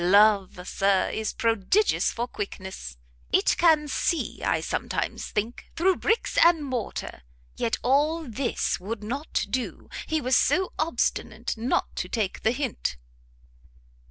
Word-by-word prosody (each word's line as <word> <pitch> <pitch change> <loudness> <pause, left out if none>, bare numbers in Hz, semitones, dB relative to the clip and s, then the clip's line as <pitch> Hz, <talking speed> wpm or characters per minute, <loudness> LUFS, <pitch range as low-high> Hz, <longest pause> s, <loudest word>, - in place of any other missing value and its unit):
Love, 195 -1 +4
Sir, 195 -1 +2
is 220 -1 -2
prodigious 230 - +2
for 240 +1 -3
quickness! 190 - -6 0.3
it - - +3
can 315 -3 +5
see, 325 +3 -1
I - - +1
sometimes - - -3
think, 220 +3 -3
through 370 +2 +3
bricks 450 +2 +1
and 335 -3 +5
mortar. 250 - -4 0.3
Yet 230 - 0
all 295 +6 +2
this 245 +2 -1
would 210 +3 -5
not 275 +8 -2
do, 255 -1 -3 0.2
he 315 0 +1
was 255 -2 +2
so 365 +7 +2
obstinate 235 -6 -1
not 235 +3 -1
to - - -3
take 215 -5 -2
the - - +3
hint!" 250 - -2
240 Hz, 130 wpm, -26 LUFS, 210-300 Hz, 0.3 s, can